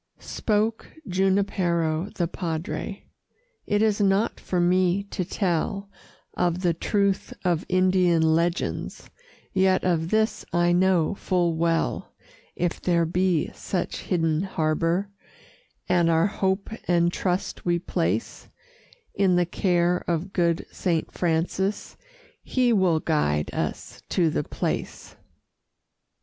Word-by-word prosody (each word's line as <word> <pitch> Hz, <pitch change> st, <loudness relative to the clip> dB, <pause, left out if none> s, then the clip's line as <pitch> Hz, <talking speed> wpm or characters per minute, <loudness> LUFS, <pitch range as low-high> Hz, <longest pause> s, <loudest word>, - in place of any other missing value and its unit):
Spoke 215 Hz, +1 st, -1 dB
Junipero 185 Hz, -3 st, +1 dB
the 175 Hz, -, 0 dB
Padre: 175 Hz, +3 st, -4 dB, 0.6 s
"It 205 Hz, +1 st, +2 dB
is 215 Hz, -1 st, +2 dB
not 200 Hz, +2 st, +2 dB
for 180 Hz, -, -2 dB
me 180 Hz, +2 st, +2 dB
to 185 Hz, -, -2 dB
tell 195 Hz, +2 st, -2 dB, 0.4 s
Of 175 Hz, 0 st, 0 dB
the 175 Hz, -2 st, +2 dB
truth 200 Hz, +3 st, 0 dB
of 175 Hz, -2 st, 0 dB
Indian 185 Hz, -2 st, +3 dB
legends, 170 Hz, +3 st, -1 dB, 0.4 s
Yet 190 Hz, 0 st, +3 dB
of 165 Hz, -2 st, 0 dB
this 220 Hz, +2 st, +1 dB
I 175 Hz, 0 st, +2 dB
know 180 Hz, -1 st, +3 dB
full 175 Hz, -4 st, 0 dB
well 165 Hz, 0 st, -1 dB, 0.4 s
If 175 Hz, 0 st, -2 dB
there 170 Hz, -2 st, +2 dB
be 180 Hz, -1 st, +1 dB
such 180 Hz, -3 st, -3 dB
hidden 165 Hz, -3 st, 0 dB
harbor, 170 Hz, +2 st, 0 dB, 0.8 s
And 175 Hz, -2 st, +3 dB
our 165 Hz, 0 st, +3 dB
hope 195 Hz, 0 st, -1 dB, 0.2 s
and 175 Hz, 0 st, +2 dB
trust 180 Hz, 0 st, -2 dB
we 175 Hz, -1 st, +1 dB
place 105 Hz, -, -2 dB, 0.6 s
In 190 Hz, -2 st, +3 dB
the 175 Hz, 0 st, +3 dB
care 175 Hz, 0 st, +1 dB
of 175 Hz, +3 st, -2 dB
good 170 Hz, -2 st, +1 dB
Saint 170 Hz, -4 st, -1 dB
Francis, 180 Hz, +4 st, -1 dB, 0.5 s
He 250 Hz, -2 st, +1 dB
will 185 Hz, -6 st, +3 dB
guide 75 Hz, -, 0 dB
us -, -, -4 dB
to 170 Hz, -4 st, +2 dB
the 150 Hz, -, -1 dB
place." -, -, -4 dB
180 Hz, 115 wpm, -25 LUFS, 165-190 Hz, 0.8 s, Indian